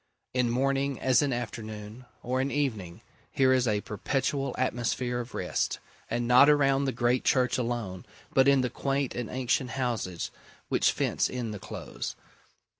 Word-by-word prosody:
In 125 -2 +2
morning, 135 +2 0
as 130 +1 +4
in 145 -2 +1
afternoon, 110 -1 -6 0.2
or 130 +2 0
in 135 - 0
evening, 110 -13 -2 0.3
here 130 -1 +4
is 130 -1 +2
a 105 -2 +1
perpetual 135 +6 -2
atmosphere 120 -1 -1
of 120 -1 -7
rest; - - -1 0.3
and 120 0 -1
not 125 +4 +7
around 140 -2 +4
the 135 - +1
great 120 +1 +1
church 130 -1 +2
alone, 115 -7 -3 0.3
but 135 0 +5
in 140 -1 +5
the 125 -2 -1
quaint 135 0 -1
and 120 -3 -4
ancient 130 0 0
houses 115 -9 -2 0.4
which - - +3
fence - - 0
in 120 -3 -3
the 105 - -6
Close. - - -6
125 Hz, 160 wpm, -28 LUFS, 120-135 Hz, 0.4 s, not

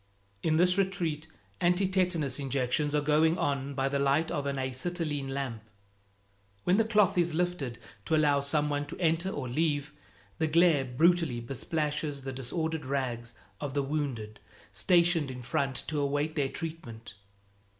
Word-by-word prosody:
In 160 -1 +1
this 180 +3 +3
retreat, 170 -5 -1 0.3
anti 180 +2 +3
tetanus 175 -8 +1
injections 140 +2 0
are 150 - +3
going 155 +3 +3
on 140 -4 -1
by 135 0 +1
the 140 0 0
light 140 +4 +2
of 145 -1 -2
an 140 0 -2
acetylene 140 +2 -2
lamp. 135 -5 -3 1.0
When 180 +2 +3
the 225 0 +3
cloth 210 -5 +3
is 170 -2 +1
lifted 175 -9 -1 0.3
to 160 - +2
allow 145 -2 +4
some 150 +1 +1
one 145 0 -1
to - - -8
enter 170 +1 +1
or 140 -8 -4
leave, 145 +2 0 0.5
the 160 - +2
glare 160 -3 +4
brutally 155 0 +2
besplashes 145 +3 -3
the 135 0 -4
disordered 160 +5 -2
rags 120 -4 -3 0.2
of 145 -1 -4
the 140 - +1
wounded 135 -7 -3 0.3
stationed 170 -4 +3
in 125 -1 -7
front 130 +2 -1
to 155 -2 -2
await 145 +2 0
their 140 -4 0
treatment. 125 -11 -7
145 Hz, 155 wpm, -29 LUFS, 135-165 Hz, 1.0 s, allow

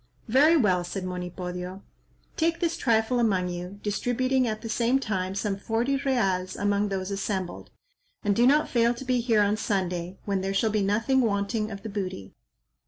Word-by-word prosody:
"Very 290 +8 +5
well," 185 - +2
said 180 +2 -5
Monipodio; 180 +1 -5 0.5
"Take 335 +1 +1
this 335 -2 0
trifle 230 +1 +1
among 190 -6 +1
you," 180 +3 -6
distributing 250 +4 +1
at 215 0 -3
the - - -4
same 235 +3 +2
time 195 -7 -2
some 200 0 -1
forty 230 +6 0
reals 195 -10 0
among 205 0 +1
those 190 0 -3
assembled, 195 -2 -3 0.5
"and 205 -1 +2
do 240 +3 +4
not 300 +3 +4
fail 235 0 +2
to 265 - -8
be 250 -1 +1
here 225 -3 +3
on 205 +1 +1
Sunday, 185 -3 -2
when 195 -2 0
there 195 +1 -2
shall 220 +2 +2
be 215 0 +1
nothing 225 +7 +2
wanting 215 0 0
of 200 -2 -8
the 220 - -5
booty." 185 - -5
205 Hz, 175 wpm, -26 LUFS, 190-240 Hz, 0.5 s, Very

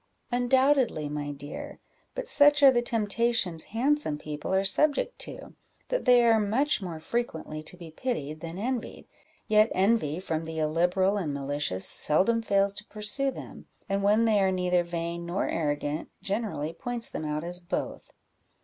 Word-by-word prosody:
"Undoubtedly, 250 - +2
my 145 0 -4
dear; 145 +1 -8 0.4
but - - -4
such 290 -7 +5
are 275 - +10
the 240 -2 +2
temptations 225 -6 0
handsome 260 - +1
people 150 +1 -6
are 190 0 +2
subject 300 - +1
to, - - -6 0.4
that - - -1
they 245 -2 +6
are 225 -1 +5
much 230 +7 +1
more 170 -4 -5
frequently 160 -7 -3
to 155 +4 -5
be 170 -2 -10
pitied 155 - -4
than 165 +2 -7
envied; 240 +3 -4 0.4
yet 215 +1 +4
envy 190 -5 +2
from 165 -3 -3
the 160 0 -6
illiberal 175 +6 +1
and 155 -8 -2
malicious 140 -9 -2
seldom 195 +10 +3
fails 200 -2 +1
to 210 - -8
pursue 220 +7 -1
them; - - -9 0.2
and 195 -1 -1
when 210 +3 +3
they 215 -2 +3
are 190 -1 +3
neither 180 -1 +1
vain 170 0 -4
nor 175 +3 -2
arrogant, 145 -1 -2
generally 195 -7 -2
points 240 +6 -2
them - - -5
out 150 0 -2
as 175 +1 -3
both." 175 +1 -5
195 Hz, 160 wpm, -27 LUFS, 160-235 Hz, 0.4 s, are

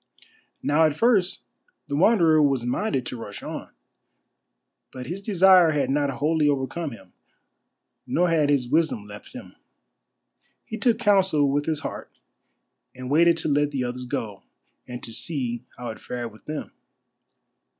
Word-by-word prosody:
Now 155 +3 +3
at 155 -2 +1
first 200 -2 +2 0.4
the 140 - -3
Wanderer 165 -3 +4
was 135 -4 +2
minded 130 - -1
to 120 -1 -6
rush 105 -2 -8
on. - - -6 1.2
But 125 -1 -8
his 180 +8 -5
desire 185 -4 +5
had 135 -3 0
not 145 0 +1
wholly 150 +2 +1
overcome 145 +4 -2
him, 95 -7 -13 0.9
nor 180 +1 +2
had 155 -3 +2
his 140 -4 +2
wisdom 155 -7 0
left 105 0 -12
him. - - -10 1.1
He 220 - -6
took 235 -4 +2
counsel 190 -10 +3
with 145 +1 0
his 155 -2 -1
heart - - -8 0.8
and 130 +1 -7
waited 170 +2 +5
to 160 - -2
let 145 0 +2
the 135 -3 -2
others 125 +1 -4
go, 105 -4 -4 0.5
and 125 0 -8
to 115 - -8
see 120 -1 -3
how 120 -1 -6
it 110 - -11
fared 120 -2 -5
with 110 - -19
them. 155 0 -5
145 Hz, 150 wpm, -24 LUFS, 125-170 Hz, 1.2 s, desire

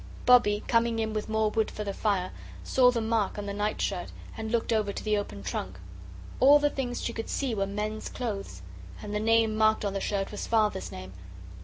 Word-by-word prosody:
Bobbie, 210 -4 +5
coming 230 -1 +2
in 220 -1 -1
with 215 0 -3
more 220 -1 +1
wood 220 0 +1
for 210 - -5
the 200 -1 -3
fire, 195 -3 0 0.3
saw 255 -1 +4
the 240 -2 0
mark 220 -3 0
on 205 - -4
the 200 - -4
night 210 +1 -1
shirt, 185 -3 -2 0.2
and 220 0 -5
looked 235 0 +1
over 215 -2 +1
to - - -6
the 215 -1 +1
open 200 - -4
trunk. 95 0 -4 0.6
All 280 +3 +8
the 290 0 +1
things 245 -3 -3
she 235 - -2
could 225 - -5
see 270 -4 -1
were 195 -2 -1
men's 210 +2 -4
clothes. 195 - -5 0.4
And 210 - -5
the 210 - 0
name 225 0 +3
marked 215 -1 +3
on 200 - -1
the 195 - -2
shirt 195 -1 -2
was 210 - -5
Father's 215 -4 +1
name. 95 0 -8
215 Hz, 215 wpm, -28 LUFS, 200-230 Hz, 0.6 s, All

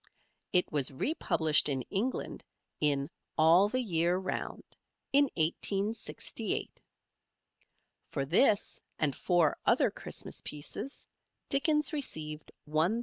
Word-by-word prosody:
It 180 -1 +2
was 145 -3 +1
republished 155 - +2
in 135 -2 -1
England 225 +6 -2 0.4
in 140 -2 +1 0.3
"All 170 +6 +6
the 255 +3 0
Year 175 -3 +1
Round" 185 0 -4 0.5
in 285 +1 +6
1868. 195 +7 -1 1.3
For 140 -2 -2
this 200 - +3 0.2
and 145 -3 0
four 175 -4 +2
other - - +3
Christmas - - -7
pieces 150 - -6 0.4
Dickens 300 +3 +2
received 155 - -3 0.2
£1,000. 160 +9 +1
175 Hz, 100 wpm, -31 LUFS, 150-220 Hz, 1.3 s, All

